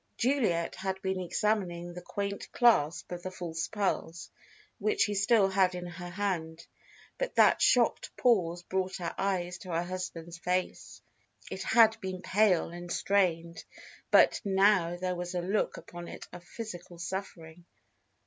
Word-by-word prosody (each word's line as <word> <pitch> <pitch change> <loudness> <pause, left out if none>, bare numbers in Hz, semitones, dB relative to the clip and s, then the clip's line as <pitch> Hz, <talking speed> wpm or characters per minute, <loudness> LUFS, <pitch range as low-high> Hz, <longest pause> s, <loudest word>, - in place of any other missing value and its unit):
Juliet 225 -11 +1
had 190 0 -3
been 190 -1 -1
examining 180 -2 -1
the 180 - -8
quaint 200 +2 -5
clasp 175 - +3
of 175 0 -5
the 185 - -5
false 170 -3 -4
pearls, 190 -5 -2 0.5
which 430 -2 0
she 210 - +3
still 200 +1 +4
had 190 -1 +2
in 180 0 -5
her 175 0 -7
hand, 170 -4 -3 0.5
but - - -2
that - - +5
shocked - - +3
pause 175 -8 +2
brought 190 +1 -2
her 175 -2 -4
eyes 180 -3 -2
to 185 - -11
her 170 0 0
husband's 175 -2 -6
face. 180 +1 -3 0.5
It 190 - -5
had 225 +2 +4
been 185 -1 -5
pale 195 -5 +3
and 175 0 -8
strained, 170 -4 0 0.5
but - - +5
now 195 -3 +3
there 180 0 -2
was 180 0 -5
a 175 - 0
look 195 +4 -1
upon 175 0 -9
it - - -9
of 180 - -9
physical 175 -4 -8
suffering. 175 -2 -6
180 Hz, 150 wpm, -30 LUFS, 175-200 Hz, 0.5 s, that